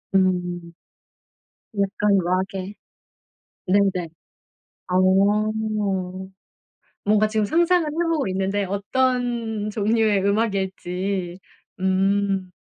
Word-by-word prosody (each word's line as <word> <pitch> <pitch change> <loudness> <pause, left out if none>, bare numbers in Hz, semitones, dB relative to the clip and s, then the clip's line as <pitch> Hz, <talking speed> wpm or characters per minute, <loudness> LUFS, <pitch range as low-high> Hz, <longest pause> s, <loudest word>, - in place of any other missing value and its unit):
음. 180 -2 0 1.1
약간 200 0 +2
락에 190 +2 -2 0.9
네네. 185 -3 +2 0.8
어. 195 +4 +3 1.5
뭔가 215 +1 +4
지금 215 -1 0
상상을 340 - +3
해 330 +3 -1
보고 310 -8 0
있는데 195 +2 -1
어떤 230 +1 -1
종류의 215 -1 +2
음악일지. 190 -3 -1 0.4
음. 190 0 +1
200 Hz, 145 characters per minute, -23 LUFS, 185-215 Hz, 1.5 s, 뭔가